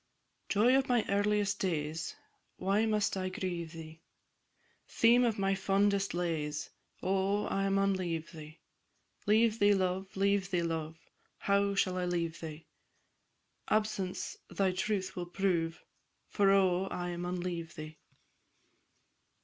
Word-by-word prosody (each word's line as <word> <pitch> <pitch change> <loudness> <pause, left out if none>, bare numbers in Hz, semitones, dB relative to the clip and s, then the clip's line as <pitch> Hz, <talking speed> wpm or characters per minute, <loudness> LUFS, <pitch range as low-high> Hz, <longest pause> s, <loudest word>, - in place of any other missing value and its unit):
"_ - - -41
Joy 230 +5 +4
of 270 -1 +2
my 240 -3 +3
earliest 205 0 +1
days, 155 -3 -2 0.4
Why 200 +4 +1
must 210 -2 +1
I 185 -1 -2
grieve 180 -4 -4
thee? 160 0 -10 0.9
Theme 235 +2 +4
of 230 -3 +1
my 195 0 +1
fondest 195 0 +1
lays, 160 -4 -2 0.3
Oh, 195 +2 +1
I 195 0 0
maun 195 0 +2
leave 170 -3 -3
thee! 155 -1 -11 0.7
Leave 220 +1 +4
thee, 205 0 +5
love! 190 0 -2
leave 200 -1 +2
thee, 175 -3 0
love! 160 -1 -3 0.4
How 200 0 +1
shall 185 -2 +1
I 180 - -1
leave 170 -2 -2
thee? 160 -1 -8 1.0
Absence 210 -4 -1
thy 195 -2 +1
truth 190 0 -2
will 175 -1 -4
prove, 175 -3 -1 0.5
For, 200 -2 +3
oh! 190 -1 +3
I 175 -1 -3
maun 175 +1 -3
leave 170 -2 -4
thee! 155 -1 -9
190 Hz, 135 wpm, -32 LUFS, 170-200 Hz, 1.0 s, thee